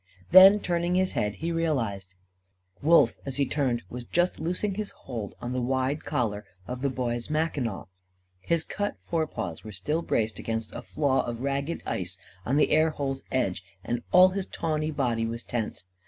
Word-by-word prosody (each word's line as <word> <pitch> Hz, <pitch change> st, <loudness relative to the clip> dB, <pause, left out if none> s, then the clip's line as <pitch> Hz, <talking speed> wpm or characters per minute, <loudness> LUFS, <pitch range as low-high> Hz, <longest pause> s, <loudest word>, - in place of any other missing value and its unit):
Then 190 Hz, +3 st, +10 dB
turning 175 Hz, -1 st, 0 dB
his 185 Hz, 0 st, +2 dB
head, 105 Hz, 0 st, -1 dB
he 165 Hz, +2 st, -3 dB
realised. 115 Hz, -, -1 dB, 0.7 s
Wolf, 150 Hz, -6 st, +5 dB
as 135 Hz, -2 st, -3 dB
he 140 Hz, 0 st, +2 dB
turned, 130 Hz, -5 st, 0 dB
was 125 Hz, +4 st, -7 dB
just 175 Hz, +9 st, 0 dB
loosing 180 Hz, +5 st, -1 dB
his 210 Hz, +1 st, -3 dB
hold 115 Hz, -6 st, -7 dB
on 120 Hz, +1 st, -4 dB
the 130 Hz, -, -1 dB
wide 130 Hz, +3 st, 0 dB
collar 105 Hz, -4 st, -1 dB, 0.2 s
of 125 Hz, +3 st, -5 dB
the 140 Hz, -, +1 dB
Boy's 120 Hz, -1 st, -2 dB
mackinaw. 150 Hz, -9 st, -1 dB, 0.5 s
His 160 Hz, -, +1 dB
cut 205 Hz, 0 st, -3 dB
forepaws 120 Hz, -, -2 dB
were 110 Hz, -, -8 dB
still 150 Hz, -, -2 dB
braced 110 Hz, -8 st, -1 dB
against 115 Hz, -1 st, -3 dB
a -, -, -5 dB
flaw 135 Hz, 0 st, +1 dB
of 120 Hz, 0 st, -4 dB
ragged 140 Hz, +4 st, -2 dB
ice 90 Hz, 0 st, -3 dB, 0.3 s
on 135 Hz, +4 st, +2 dB
the 150 Hz, -, +3 dB
air 155 Hz, +1 st, +5 dB
hole's 135 Hz, -3 st, -3 dB
edge, 100 Hz, -9 st, 0 dB, 0.2 s
and 120 Hz, +3 st, -2 dB
all 185 Hz, +1 st, +8 dB
his 190 Hz, 0 st, -3 dB
tawny 155 Hz, -1 st, -1 dB
body 120 Hz, -6 st, 0 dB
was 115 Hz, +1 st, -4 dB
tense. 110 Hz, -6 st, -3 dB
135 Hz, 175 wpm, -27 LUFS, 115-165 Hz, 0.7 s, Then